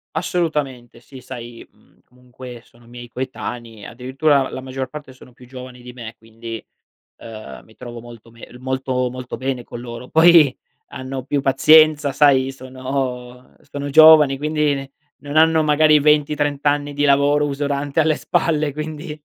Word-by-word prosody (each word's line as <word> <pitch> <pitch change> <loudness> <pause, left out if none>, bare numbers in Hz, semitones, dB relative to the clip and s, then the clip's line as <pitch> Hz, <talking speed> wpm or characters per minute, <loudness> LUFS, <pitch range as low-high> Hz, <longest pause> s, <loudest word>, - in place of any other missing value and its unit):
Assolutamente 150 -9 -3
sì. 130 +1 -14
Sai, 120 -2 -10
mhmm, - - -30
comunque 125 -1 -13
sono 120 0 -23
miei 120 0 -11
coetanei, 120 -4 -7
addirittura 135 +4 0
la - - -6
la 130 - -7
maggior 130 0 -5
parte 145 -1 -10
sono 130 -1 -18
più 125 0 -17
giovani 125 -1 -11
di 125 0 -11
me, 115 -2 -9
quindi, 115 0 -9 0.6
uhm, 110 - -10
mi 110 - -21
trovo 120 -1 -9
molto 115 -1 -14
me 115 - -13
molto 130 -1 -2
molto 125 0 -7
bene 130 -2 -4
con 120 - -10
loro. 120 +1 -9
Poi 160 -4 +5 0.3
hanno 130 0 -7
più 140 +1 -1
pazienza, 150 +2 +4
sai, 135 -2 +3
sono 130 -1 -6 0.2
sono 145 0 -5
giovani, 155 -2 +7
quindi 150 0 0
ne 135 0 -7 0.3
non 145 +1 -7
hanno 160 0 +4
magari 155 0 +4
20-30 145 -1 +1
anni 145 0 0
di 145 +1 -1
lavoro 145 +1 +3
usurante 140 +1 -2
alle 155 -1 +2
spalle, 155 -3 -1
quindi 150 0 -7
135 Hz, 155 wpm, -19 LUFS, 125-150 Hz, 0.6 s, giovani